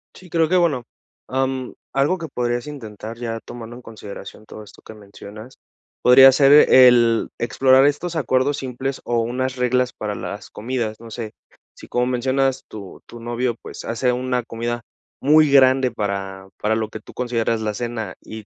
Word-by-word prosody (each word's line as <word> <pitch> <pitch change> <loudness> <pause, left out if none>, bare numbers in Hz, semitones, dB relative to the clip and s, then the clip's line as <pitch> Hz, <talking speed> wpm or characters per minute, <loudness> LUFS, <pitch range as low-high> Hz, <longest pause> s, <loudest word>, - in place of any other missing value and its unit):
Sí, 185 - -15
creo 165 -1 +1
que 185 - +3
bueno, 155 -8 +1 0.4
am, 130 -1 -2 0.2
algo 140 +7 +1
que 165 -2 -6
podrías 120 0 -2
intentar 115 -5 -8
ya 115 -1 -4
tomando 120 -1 -9
en 125 - -11
consideración 110 -2 -11
todo 110 - -11
esto 105 - -17
que - - -12
mencionas, 105 +3 -13 0.4
podría 135 +2 +8
ser 135 +1 +4 0.2
el 120 -3 +6
explorar 130 +3 +3
estos 160 +4 -1
acuerdos 135 -2 +1
simples, 130 0 -5
o 120 -1 0
unas 125 +3 -2
reglas 125 0 0
para 105 -1 -5
las 100 0 -7
comidas, 115 -1 -4
no 115 0 -12
sé. 110 -1 -6 0.4
Si - - -13
como 125 0 0
mencionas, 130 +1 0
tu 100 -3 -10
tu 120 - -12
novio, 120 +1 -2
pues, - - -9
hace 120 +2 0
una 125 0 -1
comida 120 +1 -4 0.4
muy 150 +1 +5
grande 130 -1 +5
para 100 -3 -4
para 110 +1 0
lo 110 -1 -2
que 110 - -8
tú - - -15
consideras 115 -2 -1
la 105 -1 -2
cena, 115 -3 -5
y 110 -1 -10
120 Hz, 170 wpm, -21 LUFS, 110-130 Hz, 0.4 s, podría